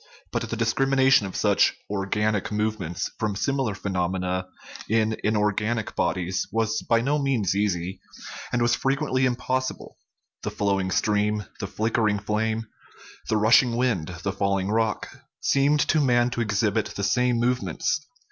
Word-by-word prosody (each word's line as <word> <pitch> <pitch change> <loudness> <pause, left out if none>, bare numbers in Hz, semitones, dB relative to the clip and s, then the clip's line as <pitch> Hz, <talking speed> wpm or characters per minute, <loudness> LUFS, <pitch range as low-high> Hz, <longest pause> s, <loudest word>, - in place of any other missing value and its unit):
But - - -2
the - - -2
discrimination 130 0 +3
of 95 - -9
such - - +3
" - - -38
organic 105 +1 -1
movements 105 -5 -2
" - - -38
from 105 -2 -1
similar 135 -2 -1
phenomena 90 -1 -2 0.4
in 110 0 +2
inorganic 105 +1 0
bodies 90 +1 -1
was 110 0 0
by 115 0 +2
no 145 +5 +1
means 120 -9 +1
easy, 95 -2 -1 0.5
and 120 -1 +1
was 120 0 +3
frequently 135 -1 +1
impossible; 130 +1 -3 0.4
the - - -3
flowing 95 -2 0
stream, 105 +1 +1
the - - -3
flicker 110 0 0
ing 105 - 0
flame, 110 +2 -1 0.6
the 110 - +2
rushing 115 +3 +5
wind, 115 -11 0 0.2
the 100 - -1
falling 100 0 0
rock, 110 -1 0 0.3
seemed 140 +2 +3
to 155 +1 +2
man 120 -2 +3
to 120 - -2
exhibit 105 -1 0
the 100 - -3
same 120 +4 +2
movements. 125 +5 0
110 Hz, 145 wpm, -25 LUFS, 100-120 Hz, 0.6 s, rushing